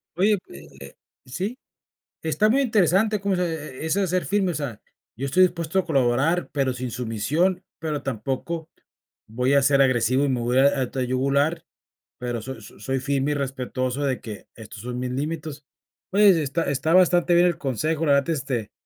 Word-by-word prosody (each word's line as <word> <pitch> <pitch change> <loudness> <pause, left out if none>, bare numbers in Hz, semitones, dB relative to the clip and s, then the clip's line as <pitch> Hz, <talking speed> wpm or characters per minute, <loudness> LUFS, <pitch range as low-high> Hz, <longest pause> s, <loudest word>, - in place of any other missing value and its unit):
Oye, 200 +4 +3
eh, 70 +1 -12
eh, 70 0 -11 0.3
sí, 190 - -4 0.7
está 200 +7 +2
muy 265 +5 +3
interesante 210 - +2
como 195 -1 0
dices, 175 -2 -1 0.2
e 130 - -9
e - - -2
eso 165 +5 +1
de 195 - +1
ser 180 0 -1
firme, 195 -2 +1
o - - -7
sea, 140 -8 -5 0.3
yo 135 - -4
estoy 180 +7 +4
dispuesto 170 0 -1
a 185 - +1
colaborar, 140 +4 +1
pero 135 -3 0
sin 125 0 -4
sumisión, 135 - -1
pero 150 -3 -3
tampoco 135 +7 -4 0.6
voy 125 +5 0
a 140 - +5
ser 140 +1 +4
agresivo 130 +1 +2
y - - +1
me 125 -2 0
voy 120 +2 +1
a - - +7
ir 140 - 0
a 135 - -2
a 125 - -3
tu 135 - -3
yugular, 140 +6 0 0.6
pero 120 -2 -3
so 130 -1 -7
so - - -14
soy 135 +5 -2
firme 140 +1 0
y - - +2
respetuoso 130 -1 -3
de 135 -3 -1
que, 105 -4 -9
estos 110 -2 -10
son 125 +1 -5
mis 125 0 -3
límites. 150 +1 -4 0.5
Oye, 195 -4 +5
está 150 +4 -1
está 140 +4 0
bastante 175 -1 +4
bien 175 +1 +5
el 170 -3 0
consejo, 155 +2 -1
la 145 - +4
verdad, 140 +2 +2
este, 130 -7 -3
140 Hz, 200 wpm, -24 LUFS, 130-170 Hz, 0.7 s, a